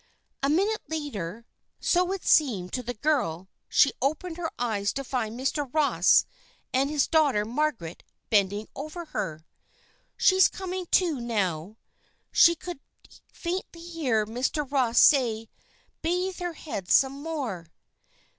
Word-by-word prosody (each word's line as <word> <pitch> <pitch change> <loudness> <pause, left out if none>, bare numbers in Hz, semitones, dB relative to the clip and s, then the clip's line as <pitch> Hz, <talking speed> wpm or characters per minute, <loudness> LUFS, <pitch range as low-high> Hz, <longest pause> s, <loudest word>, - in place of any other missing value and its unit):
A 275 - +1
minute 400 +8 +1
later, 230 - -5 0.3
so 360 +1 +2
it 390 -1 -4
seemed 210 - +3
to 250 - -1
the 245 0 -5
girl, 195 - -1 0.2
she 275 - +5
opened 315 +5 -1
her 340 -2 -2
eyes 210 -4 -1
to 275 - -3
find 240 -3 -3
Mr. 270 0 -2
Ross 305 -1 +4 0.5
and 270 +2 +2
his 295 -2 +2
daughter, 285 -10 +3
Margaret, 235 - -2 0.3
bending 205 0 +2
over 310 +5 -6
her. 165 - -5 0.7
"She's 375 0 +5
coming 370 -1 -5
to, 330 -7 +2
now," 200 -4 -2 0.5
she 340 0 +6
could 350 -2 -8 0.5
faintly 345 -1 -5
hear 300 -11 -1
Mr. 255 +6 -2
Ross 250 -4 +1
say. 230 -6 +4 0.5
"Bathe 360 +3 -1
her 350 -1 -3
head 205 - -6
some 275 +1 +3
more." 265 - -4
275 Hz, 130 wpm, -27 LUFS, 220-325 Hz, 0.7 s, she